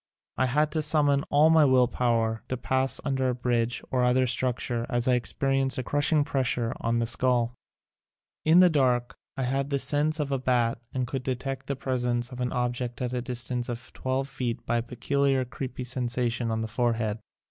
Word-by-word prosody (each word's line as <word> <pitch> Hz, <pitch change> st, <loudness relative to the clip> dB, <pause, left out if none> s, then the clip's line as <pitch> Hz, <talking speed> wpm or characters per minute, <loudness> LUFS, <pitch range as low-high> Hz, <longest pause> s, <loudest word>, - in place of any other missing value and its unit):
I 130 Hz, -, +1 dB
had 150 Hz, +4 st, +1 dB
to 155 Hz, +1 st, +1 dB
summon 145 Hz, -2 st, +3 dB
all 150 Hz, +3 st, +5 dB
my 160 Hz, -1 st, +6 dB
will 130 Hz, -3 st, +4 dB
power 115 Hz, -2 st, 0 dB
to 130 Hz, -, -2 dB
pass 130 Hz, +2 st, 0 dB
under 130 Hz, -2 st, 0 dB
a 125 Hz, -, -1 dB
bridge 120 Hz, -1 st, -1 dB
or 125 Hz, -1 st, +1 dB
other 125 Hz, +1 st, +3 dB
structure 120 Hz, -1 st, -1 dB
as 120 Hz, 0 st, 0 dB
I 130 Hz, -, +4 dB
ex 120 Hz, -1 st, 0 dB
perienced 135 Hz, -1 st, +1 dB
a 130 Hz, -, -2 dB
crushing 145 Hz, +3 st, +2 dB
pressure 130 Hz, -4 st, -1 dB
on 115 Hz, 0 st, 0 dB
the 115 Hz, -, +1 dB
skull. 120 Hz, 0 st, +1 dB, 0.9 s
In 165 Hz, +3 st, +6 dB
the 180 Hz, -, +7 dB
dark 125 Hz, -4 st, +1 dB, 0.2 s
I 135 Hz, -, -1 dB
had 135 Hz, +2 st, -1 dB
the 140 Hz, -, +1 dB
sense 150 Hz, +3 st, +1 dB
of 145 Hz, -2 st, -2 dB
a 135 Hz, -, 0 dB
bat 120 Hz, -2 st, +1 dB
and 130 Hz, -1 st, -1 dB
could 130 Hz, +1 st, -4 dB
detect 130 Hz, +1 st, -4 dB
the 140 Hz, -, -1 dB
presence 125 Hz, -2 st, -1 dB
of 125 Hz, 0 st, -6 dB
an 125 Hz, -, -1 dB
object 120 Hz, 0 st, -2 dB
at 125 Hz, -1 st, -2 dB
a 125 Hz, -, -1 dB
distance 125 Hz, 0 st, -2 dB
of 120 Hz, -1 st, -6 dB
twelve 130 Hz, +1 st, -2 dB
feet 130 Hz, -4 st, -4 dB
by 120 Hz, -, +1 dB
a -, -, +1 dB
peculiar 135 Hz, +2 st, 0 dB
creepy 130 Hz, 0 st, -6 dB
sensation 125 Hz, -1 st, -1 dB
on 110 Hz, 0 st, -1 dB
the 110 Hz, -, -2 dB
forehead. 110 Hz, -2 st, -1 dB
125 Hz, 200 wpm, -27 LUFS, 120-135 Hz, 0.9 s, the